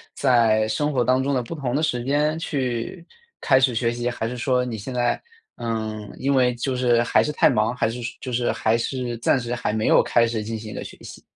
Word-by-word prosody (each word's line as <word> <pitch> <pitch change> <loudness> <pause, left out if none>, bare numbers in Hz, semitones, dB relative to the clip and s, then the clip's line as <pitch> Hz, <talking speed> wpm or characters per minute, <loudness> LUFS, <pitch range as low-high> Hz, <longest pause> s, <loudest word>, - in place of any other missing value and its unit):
在 115 -5 +3
生 145 +7 0
活 125 -3 +2
当 130 +1 +2
中 140 +1 0
的 125 - 0
不 120 - -7
同 135 -5 -3
的 155 - +1
时 125 -6 0
间， 150 +4 0
去 130 +3 -3 0.4
开 130 -1 +4
始 130 -3 +2
学 115 0 +1
习， 120 +1 -2
还 115 - -4
是 125 +2 -4
说 125 0 +1
你 120 -3 -4
现 110 +5 -7
在， 120 -1 0 0.4
嗯， 110 -2 -4
因 140 +1 0
为 125 -1 +3
就 125 +2 -2
是 120 -2 +3
还 - - +3
是 - - -1
太 - - +4
忙， 110 +3 +1
还 125 - 0
是 120 +2 -6
说 120 - -6
就 130 - -5
是， 120 0 0
还 110 +1 +1
是 120 0 -3
暂 120 - +2
时 120 -1 -3
还 115 -3 -2
没 110 0 0
有 - - +6
开 120 - +3
始 115 -1 -2
进 115 0 -4
行 110 -1 -8
一 - - -7
个 - - -5
学 - - -10
习？ - - -11
120 Hz, 270 characters per minute, -23 LUFS, 115-130 Hz, 0.4 s, 有